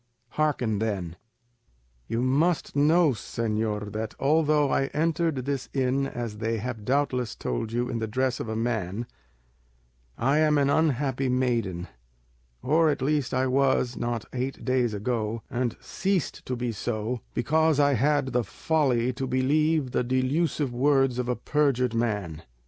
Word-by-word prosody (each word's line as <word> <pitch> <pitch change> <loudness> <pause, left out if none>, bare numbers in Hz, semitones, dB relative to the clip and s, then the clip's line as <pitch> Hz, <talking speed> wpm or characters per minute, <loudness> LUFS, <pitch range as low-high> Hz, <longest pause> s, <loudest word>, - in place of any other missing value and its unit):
Hearken 125 -8 0
then. 95 -7 -2 0.9
"You 115 +2 -1
must 150 +7 +1
know, 155 +2 +4
señor, 110 -3 -2
that 110 0 -4
although 150 0 +3
I 135 - +2
entered 160 -4 0
this 140 -2 -3
inn, 135 +1 +1
as 115 -5 -5
they 115 +1 -1
have 115 -1 -5
doubtless 130 -3 0
told 85 - -3
you, 120 +1 -1
in 120 - -3
the 110 - -2
dress 130 +3 0
of 115 - -4
a 110 - -2
man, 110 -2 -2 1.1
I 135 +5 +2
am 155 -1 +4
an 140 0 +3
unhappy 135 -4 +1
maiden, 115 -9 0 0.8
or 160 +4 +3
at 145 -3 -1
least 145 -1 0
I 130 0 +1
was 130 -2 +2
one 120 - -2
not 115 -2 -3
eight 130 +1 -4
days 125 -4 +1
ago, 110 +1 -2
and 125 -2 -1
ceased 190 -4 -2
to 130 - -1
be 120 -1 -2
so, 115 +2 -3 0.2
because 155 +4 +2
I 145 -1 +4
had 140 +2 +2
the 125 0 +2
folly 130 -2 0
to 135 +1 -3
believe 145 +2 +1
the 125 - +1
delusive 130 +2 0
words 135 -1 +2
of 125 0 -2
a 125 - +1
perjured 130 -2 +1
man. 105 -9 -2
130 Hz, 155 wpm, -26 LUFS, 115-145 Hz, 1.1 s, know